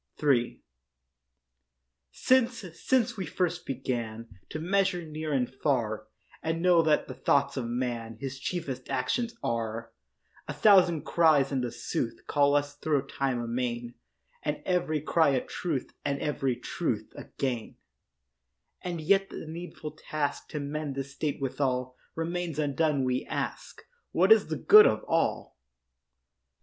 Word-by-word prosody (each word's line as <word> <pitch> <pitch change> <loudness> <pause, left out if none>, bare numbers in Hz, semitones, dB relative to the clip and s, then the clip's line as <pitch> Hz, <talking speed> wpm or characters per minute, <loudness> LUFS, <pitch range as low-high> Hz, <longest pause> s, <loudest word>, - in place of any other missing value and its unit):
III 125 -5 +2 1.5
Since, 250 -4 +2
since 240 +4 +1
we 190 -4 -3
first 175 0 -2
began 115 -4 -3 0.2
To - - -4
measure 180 +1 +1
near 155 0 -5
and 130 -3 +1
far, 120 -6 -1 0.3
And 165 +1 -1
know 175 -2 +6
that 155 -2 +2
the - - -6
thoughts 140 0 +1
of 130 -4 -2
man 120 -2 -3
His 135 0 -5
chiefest 135 -5 -4
actions 230 - -1
are, 115 0 -2 0.6
A - - -3
thousand 180 -7 +5
cries 155 -5 +4
in 125 -3 0
sooth - - -4
Call 145 0 +3
us 145 0 0
thro' 145 -2 0
time 135 -3 -1
amain, 120 0 -3 0.5
And 150 0 -3
every 175 -5 0
cry 160 +1 +3
a 130 - -1
truth 155 -8 -3
And 140 0 -1
every 135 -4 0
truth - - -3
a - - -8
gain, 125 -5 -2 1.1
And 175 -2 -4
yet 195 +5 +3
the - - -7
needful 160 -1 -7
task, 150 -1 -3
To 150 - -4
mend 145 0 -4
this 135 0 -5
state 145 0 -2
withal, 130 -2 -1 0.2
Remains 170 0 -3
undone; 150 -1 +1
we 130 0 0
ask, - - -4 0.3
What - - +4
is 445 - +7
the - - -2
good 425 +1 +8
of - - 0
all? 165 - -1
145 Hz, 140 wpm, -29 LUFS, 130-165 Hz, 1.5 s, good